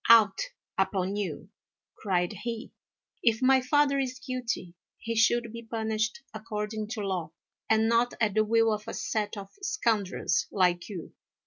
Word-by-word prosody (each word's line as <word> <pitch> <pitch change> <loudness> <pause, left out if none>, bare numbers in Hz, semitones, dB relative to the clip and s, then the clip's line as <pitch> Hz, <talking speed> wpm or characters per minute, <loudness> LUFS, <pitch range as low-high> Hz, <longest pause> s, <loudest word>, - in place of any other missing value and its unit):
"Out 220 -4 +7 0.4
upon 190 0 +1
you!" 205 -2 -4 0.5
cried 180 -2 0
he; 230 +3 -5 0.5
"if 225 -2 +3
my 265 0 +5
father 280 +1 +3
is 255 -1 -2
guilty 245 -8 -4 0.2
he 230 0 -4
should 230 0 +3
be 230 - -6
punished 220 -1 -2
according 215 0 -4
to 220 -1 -4
law, 190 -5 -2 0.4
and 220 0 +4
not 235 +1 +2
at 215 -4 +2
the 215 +1 +4
will 225 0 +3
of 210 +1 -5
a - - -4
set 210 -1 -2
of 195 -1 -8
scoundrels 220 - 0
like 180 -2 +2
you." 180 -6 -7
220 Hz, 150 wpm, -29 LUFS, 205-235 Hz, 0.5 s, Out